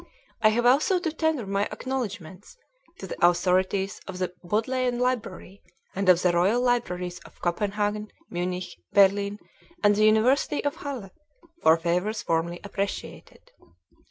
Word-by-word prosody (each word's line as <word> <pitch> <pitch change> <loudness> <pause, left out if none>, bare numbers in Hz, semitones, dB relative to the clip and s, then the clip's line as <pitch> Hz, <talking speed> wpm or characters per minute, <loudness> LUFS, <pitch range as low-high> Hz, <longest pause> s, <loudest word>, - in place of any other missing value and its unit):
I 215 - +6
have 235 +2 0
also 285 +10 +4
to 350 -3 -2
tender 315 -6 -1
my 200 +1 0
acknowledgements 215 - -6 0.4
to - - -8
the 190 - -6
authorities 185 +3 +2
of 190 -1 -6
the 185 -1 -3
Bodleian 245 +6 0
Library 230 -6 -3 0.3
and 195 0 0
of 180 -1 +5
the 180 - +4
Royal 185 +7 +2
Libraries 180 -8 -1
of - - -17
Copenhagen, 205 +3 -1 0.2
Munich, 180 +1 -4
Berlin 200 +1 +4 0.5
and 205 0 +5
the 215 +1 +3
University 235 +7 +3
of 285 +3 -1
Halle, 255 -9 -6 0.5
for 160 +1 +5
favors 180 +6 -1
warmly 170 +1 0
appreciated. 200 -1 -6
200 Hz, 135 wpm, -26 LUFS, 180-240 Hz, 0.5 s, I